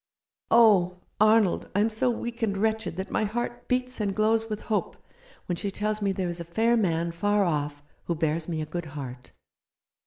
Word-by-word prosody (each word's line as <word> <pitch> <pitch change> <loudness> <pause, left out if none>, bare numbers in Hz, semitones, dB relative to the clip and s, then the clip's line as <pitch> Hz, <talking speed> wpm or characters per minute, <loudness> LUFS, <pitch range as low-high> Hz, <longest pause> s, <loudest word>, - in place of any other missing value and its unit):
Oh, 200 -6 +5 0.2
Arnold, 215 -2 +4
I - - +3
am 220 +2 +2
so 220 +4 +1
weak 235 0 -4
and 200 -3 0
wretched 220 -2 0
that 190 +2 -5
my - - +1
heart 240 +3 -3
beats 255 -1 -1
and 200 -2 -1
glows 220 +1 +2
with 215 -1 -3
hope 215 -2 -2 0.5
when 175 - -2
she 200 - -2
tells 210 +2 -2
me 200 -1 +1
there 190 -1 -2
is 175 0 -3
a - - -4
fair 225 +8 +2
man 170 -6 +1
far 205 +4 +1
off 145 -4 -2 0.2
who 170 - -1
bears 160 +1 -1
me 160 -2 -2
a - - -2
good 170 +2 -5
heart. 125 -2 -7
205 Hz, 195 wpm, -27 LUFS, 170-220 Hz, 0.5 s, Oh